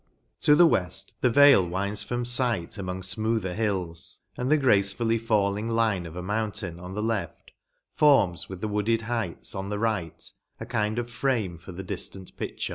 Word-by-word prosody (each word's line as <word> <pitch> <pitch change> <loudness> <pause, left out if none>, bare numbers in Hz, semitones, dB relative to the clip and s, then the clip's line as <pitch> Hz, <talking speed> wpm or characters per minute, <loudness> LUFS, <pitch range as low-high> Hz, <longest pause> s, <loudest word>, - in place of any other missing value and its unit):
To 150 - +5
the 175 - +7
weft, 90 - 0
the 125 - +4
vale 140 -4 +7
winds 100 +4 -2
from 120 +2 -3
fight 120 -7 0
among 95 -1 -4
fmoother 105 0 -1
hills; 95 -6 -2
and 125 +1 -2
the 155 - +5
gracefully 115 -2 +2
falling 105 -1 0
line 110 -6 +1
of 80 - -10
a 90 - -5
mountain, 105 -3 -3
on 90 +2 -8
the 105 - -2
left, 110 -7 -3 0.4
forms, 115 - +3
with 95 -1 -8
the 110 - -1
wooded 105 +2 0
heights, 115 -7 -3
on 95 +1 -4
the 105 - -2
right, 100 -7 -2 0.4
a - - -6
kind 105 +1 -1
of 120 -1 -2
frame 115 -9 -1
for 85 - -11
the 95 +2 -7
diftant 95 0 -4
picture. - - -4
105 Hz, 180 wpm, -26 LUFS, 95-115 Hz, 0.4 s, the